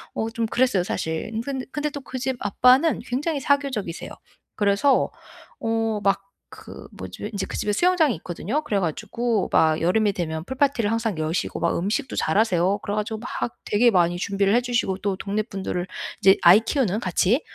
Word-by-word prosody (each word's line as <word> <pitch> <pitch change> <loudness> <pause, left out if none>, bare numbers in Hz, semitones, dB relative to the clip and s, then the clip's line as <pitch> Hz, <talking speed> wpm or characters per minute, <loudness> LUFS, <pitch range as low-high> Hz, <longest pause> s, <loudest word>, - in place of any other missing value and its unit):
어 220 - -1
좀 230 0 -2
그랬어요, 225 -5 +2
사실. 160 +1 -3
인 220 - -2
근 265 +1 -4
근데 295 0 -2
또 285 -1 -7
그 260 - -7
집 265 +1 -1
아빠는 255 +9 +4
굉장히 285 +4 -1
사교적이세요. 270 -11 -1 0.4
그래서 205 +7 +2 0.5
어 225 -1 -1
막 195 0 +2 0.3
그 - - -11
뭐지 95 - -7
인제 200 -2 -3
그 - - -7
집에 210 - -1
수영장이 330 - +3
있거든요. 185 - -3
그래 200 -7 0
가지고 215 +5 -1
막 160 0 +4
여름이 205 +5 +2
되면 160 -3 -3
풀 260 +7 -7
파티를 255 -7 +2
항상 225 -6 -1
여시고 155 +3 -2
막 - - +1
음식도 225 - -2
잘하세요. 190 +1 +2
그래 205 - -4
가지고 215 +1 -2
막 240 0 -4
되게 235 +4 +3
많이 175 -3 +2
준비를 200 +1 +1
해주시고 240 -6 0
또 200 -1 -2
동네 205 +3 -2
분들을 190 -4 -4 0.3
이제 195 0 +6
아이 180 +5 +8
키우는 225 -3 0
같이 195 - +1
215 Hz, 370 characters per minute, -24 LUFS, 190-245 Hz, 0.5 s, 아이